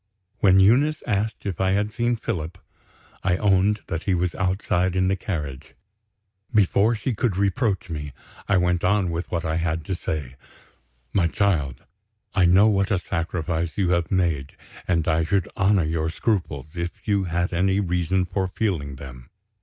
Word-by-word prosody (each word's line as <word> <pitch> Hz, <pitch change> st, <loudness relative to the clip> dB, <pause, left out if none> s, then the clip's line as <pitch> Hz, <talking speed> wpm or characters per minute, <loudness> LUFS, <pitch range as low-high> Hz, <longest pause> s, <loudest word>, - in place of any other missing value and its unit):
When 95 Hz, -1 st, +5 dB
Eunice 135 Hz, +10 st, +4 dB
asked 105 Hz, 0 st, -1 dB
if 95 Hz, -4 st, -3 dB
I 95 Hz, 0 st, +2 dB
had 105 Hz, +2 st, 0 dB
seen 120 Hz, +1 st, +1 dB
Philip, 90 Hz, -8 st, -4 dB, 0.6 s
I 90 Hz, -2 st, +1 dB
owned 100 Hz, +1 st, +2 dB
that 85 Hz, 0 st, -4 dB
he 95 Hz, -, +2 dB
was 90 Hz, 0 st, 0 dB
outside 95 Hz, -1 st, 0 dB
in 95 Hz, 0 st, +2 dB
the 95 Hz, -, +2 dB
carriage. 75 Hz, -8 st, -5 dB, 0.8 s
Before 105 Hz, +1 st, +3 dB
she 115 Hz, +4 st, -2 dB
could 105 Hz, -3 st, -1 dB
reproach 100 Hz, 0 st, 0 dB
me, 75 Hz, -4 st, -5 dB, 0.4 s
I 100 Hz, -, +3 dB
went 90 Hz, -1 st, +1 dB
on 95 Hz, -1 st, +2 dB
with 85 Hz, +2 st, -4 dB
what 85 Hz, -1 st, -2 dB
I 80 Hz, 0 st, 0 dB
had 80 Hz, -2 st, -1 dB
to 95 Hz, -, -2 dB
say: 75 Hz, -7 st, -4 dB, 0.8 s
"My 85 Hz, -4 st, +3 dB
child, 80 Hz, -9 st, 0 dB, 0.5 s
I 95 Hz, -3 st, +4 dB
know 95 Hz, +5 st, +6 dB
what 100 Hz, -2 st, +2 dB
a 100 Hz, -, +2 dB
sacrifice 85 Hz, -1 st, -3 dB
you 95 Hz, -3 st, +1 dB
have 85 Hz, -1 st, +1 dB
made; 85 Hz, -7 st, 0 dB, 0.3 s
and 85 Hz, -3 st, +1 dB
I 80 Hz, 0 st, +2 dB
should 95 Hz, +3 st, 0 dB
honor 95 Hz, -1 st, +3 dB
your 80 Hz, 0 st, -1 dB
scruples, 85 Hz, -, -2 dB
if 85 Hz, 0 st, -5 dB
you 100 Hz, -2 st, +2 dB
had 85 Hz, +1 st, -1 dB
any 95 Hz, +3 st, +2 dB
reason 90 Hz, 0 st, 0 dB
for 95 Hz, +1 st, -1 dB
feeling 90 Hz, -, -2 dB
them." 65 Hz, -2 st, -11 dB
90 Hz, 170 wpm, -24 LUFS, 80-100 Hz, 0.8 s, know